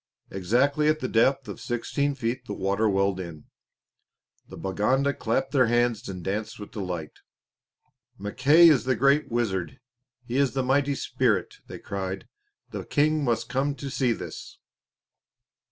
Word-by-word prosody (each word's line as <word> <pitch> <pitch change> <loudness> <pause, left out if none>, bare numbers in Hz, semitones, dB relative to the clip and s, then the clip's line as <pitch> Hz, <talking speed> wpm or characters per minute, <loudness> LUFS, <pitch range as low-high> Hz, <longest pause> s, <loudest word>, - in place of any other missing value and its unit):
Exactly 125 +11 +1
at 155 0 +2
the 130 - -2
depth 130 +3 +2
of 100 - -8
sixteen 140 +4 -1
feet 125 -1 -3
the 100 - -4
water 100 +3 +1
welled 100 -1 +1
in. 85 -5 -7 1.0
The - - -11
Baganda 125 +9 +1
clapped 135 +3 -1
their 130 -4 +4
hands 120 -3 +1
and 90 -2 -6
danced 105 +4 -3
with 105 - -9
delight. 90 -6 -5 1.0
"Mackay 140 - +5
is 135 -8 +4
the 130 -1 +2
great 140 +5 +3
wizard. 110 -1 -2 0.5
He 120 +2 -3
is 140 -2 +2
the 135 -1 0
mighty 140 +2 +1
spirit," - - 0
they - - -8
cried. 95 -1 -5 0.4
"The - - -5
King 150 +1 +1
must 120 -4 0
come 140 +2 -1
to 140 -1 -6
see 125 -1 +1
this." - - -7
120 Hz, 150 wpm, -26 LUFS, 100-140 Hz, 1.0 s, Mackay